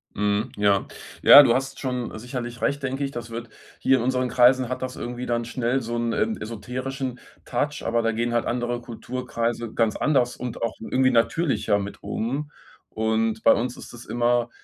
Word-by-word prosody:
Mhm. 105 +3 0
Ja. 100 -1 +2 0.3
Ja, 145 - +11
du 115 - +4
hast 135 +2 -2
schon 125 -4 -3
sicherlich 120 0 -6
recht, 140 +1 0
denke 135 +1 -2
ich. 135 - -2
Das 120 -2 -7
wird 115 0 -6 0.3
hier 135 0 +4
in 120 - -2
unseren 130 0 0
Kreisen 125 0 +4
hat 130 0 -4
das 130 0 -4
irgendwie 120 +1 -5
dann 120 -1 -1
schnell 125 +2 -1
so 120 +1 -4
'n, 115 -1 -1
ähm, 220 +1 0
esoterischen 125 +4 -5 0.3
Touch, 145 +4 -2
aber 115 0 +1
da 115 0 +1
gehen 120 +2 -1
halt 120 - +1
andere 120 0 -2
Kulturkreise 120 -1 -4
ganz 115 -2 +1
anders 130 -5 +1
und 125 -2 -6
auch 115 -1 -1
irgendwie 130 +3 +2
natürlicher 120 -2 +2
mit 100 0 -6
um 140 +6 -3 0.4
und 110 0 0
bei - - +7
uns 125 +2 -2
ist - - -11
das 120 - -11
immer 120 0 +1
120 Hz, 190 wpm, -24 LUFS, 115-130 Hz, 0.4 s, Ja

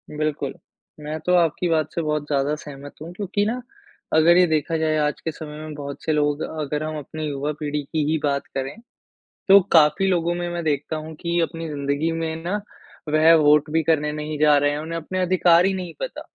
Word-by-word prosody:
बिल्कुल। 150 -2 -2 0.5
मैं 150 +1 -5
तो 180 - +2
आपकी 175 +1 +2
बात 160 -2 +1
से 170 - -1
बहुत 150 -1 -1
ज़्यादा 140 0 0
सहमत 145 -1 -10
हूँ 165 - -7
क्योंकि 205 +2 -1
ना 245 +3 -2 0.5
अगर 165 +2 +6
ये 180 - +6
देखा 160 +1 0
जाए 155 -1 +1
आज 150 -1 0
के 160 - -3
समय 150 -1 -9
में 155 -1 -7
बहुत 140 -1 -7
से 160 - 0
लोग 150 0 +1 0.2
अगर 150 +1 -2
हम 155 0 -4
अपनी 155 +1 -6
युवा 145 +1 -2
पीढ़ी 150 -1 -2
की 150 +2 -2
ही 160 - +2
बात 140 -1 0
करें 135 0 -3 0.7
तो 200 0 +9
काफ़ी 160 +4 +5
लोगों 175 -2 +1
में 175 0 -3
मैं 175 0 -4
देखता 150 0 -1
हूँ 155 +1 -6
की 170 0 0
अपनी 165 0 -3
ज़िन्दगी 145 +2 -1
में 165 -1 -2
ना 205 +4 -2 0.5
वह 155 +2 +5
वोट 150 0 +4
भी 160 0 +2
करने 150 -1 +1
नहीं 150 0 -4
जा 150 -1 +5
रहे 145 0 +2
हैं, 145 - -2
उन्हें 165 +2 -4
अपने 175 +3 -4
अधिकार 180 -1 +4
ही 195 - +2
नहीं 180 -3 -5
पता। - - -5
155 Hz, 215 wpm, -23 LUFS, 150-170 Hz, 0.7 s, तो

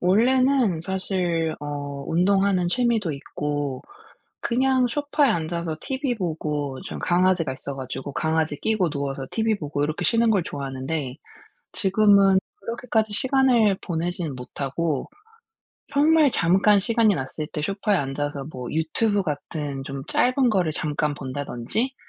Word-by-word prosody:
원래는 240 0 +3
사실 180 -3 -1
어 145 -1 -5
운동하는 185 +1 +2
취미도 225 -6 +1
있고 145 -1 -4 0.6
그냥 260 +1 +2
소파에 290 +2 +1
앉아서 165 -2 -2
TV 265 -2 -2
보고 150 -7 -3
좀 - - -6
강아지가 175 -4 +2
있어 135 +1 -6
가지고 135 +1 -6
강아지 160 -1 0
끼고 215 -6 +1
누워서 140 -2 -3
TV 220 -1 +1
보고 145 -1 -2
이렇게 155 +1 -2
쉬는 230 -1 +3
걸 195 -5 +3
좋아하는데 135 -1 -4 0.6
지금은 200 -1 +4 0.2
그렇게까지 225 -1 -1
시간을 250 -7 +3
보내진 170 -3 -3
못하고 140 +4 -3 0.9
정말 300 0 +5
잠깐 195 +4 +4
시간이 225 -1 +3
났을 140 +2 -4
때 150 - -4
소파에 200 +3 0
앉아서 140 0 -3
뭐 125 -1 -6
유튜브 200 +7 +1
같은 145 -3 -4
좀 135 -2 -6
짧은 255 0 +3
거를 180 -7 +1
잠깐 150 -1 -1
본다든지 140 - -3
175 Hz, 300 characters per minute, -24 LUFS, 145-220 Hz, 0.9 s, 정말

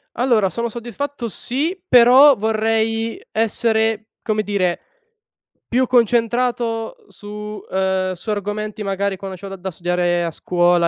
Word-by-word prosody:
Allora 235 -6 +2
sono 235 +6 -3
soddisfatto 240 +2 -5
sì, 300 - -2
però 255 +3 +7
vorrei 225 +1 0
essere, 220 0 0 0.2
come 215 -1 0
dire, 195 -4 0 0.9
più 255 +1 +1
concentrato 235 -1 +1
su 210 0 -8
ehm, 190 0 0
su 185 +5 -9
argomenti 210 +1 -3
magari 200 0 -1
quando 190 -1 -7
c'ho 195 - -9
da 195 - -6
da 190 0 -6
studiare 175 0 0
a 165 - -2
scuola, 175 +1 +2
215 Hz, 125 wpm, -20 LUFS, 190-235 Hz, 0.9 s, però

